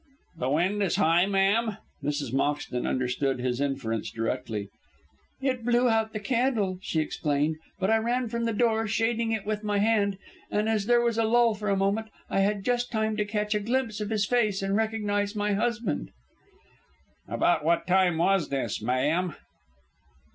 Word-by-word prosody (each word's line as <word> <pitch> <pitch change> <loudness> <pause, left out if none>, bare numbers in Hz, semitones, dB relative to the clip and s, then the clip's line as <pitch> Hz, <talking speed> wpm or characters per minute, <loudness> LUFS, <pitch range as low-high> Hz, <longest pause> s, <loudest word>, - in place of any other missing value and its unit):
"The 130 -5 -2
wind 180 +8 +1
is 195 - +1
high, 170 +4 +3
ma'am?" 200 +2 +2 0.3
Mrs. 145 -4 -2
Moxton 140 -2 -1
understood 130 +1 0
his 125 +1 -1
inference 135 -6 -2
directly. 115 -3 -3 0.7
"It 255 -3 0
blew 240 +1 +3
out 220 -1 +1
the 215 - -4
candle," 225 -5 0
she 160 - -1
explained; 150 0 -1 0.2
"but 190 +2 +1
I 225 - +5
ran 240 +2 0
from 235 +1 -2
the 230 - +1
door, 225 0 +1
shading 225 +2 0
it 220 -3 -2
with 215 0 -2
my 205 -1 0
hand, 200 -2 +2 0.3
and 210 +1 0
as 215 -2 0
there 240 0 +5
was 235 -1 0
a - - +3
lull 230 +1 +4
for 210 0 -4
a 195 - +2
moment, 200 +3 0 0.2
I - - +1
had 200 0 +1
just 245 0 0
time 220 -1 0
to 210 - +1
catch 210 0 -1
a 210 - +1
glimpse 225 0 -1
of 210 - -3
his 215 -2 +1
face 215 -4 +1
and 195 0 0
recognise 210 -2 0
my 210 0 0
husband." 215 - -1 1.2
"About - - +1
what 170 +2 +2
time 185 -2 +3
was 180 -1 +2
this, 130 -7 -2
ma'am?" 150 +9 0
205 Hz, 175 wpm, -27 LUFS, 165-225 Hz, 1.2 s, I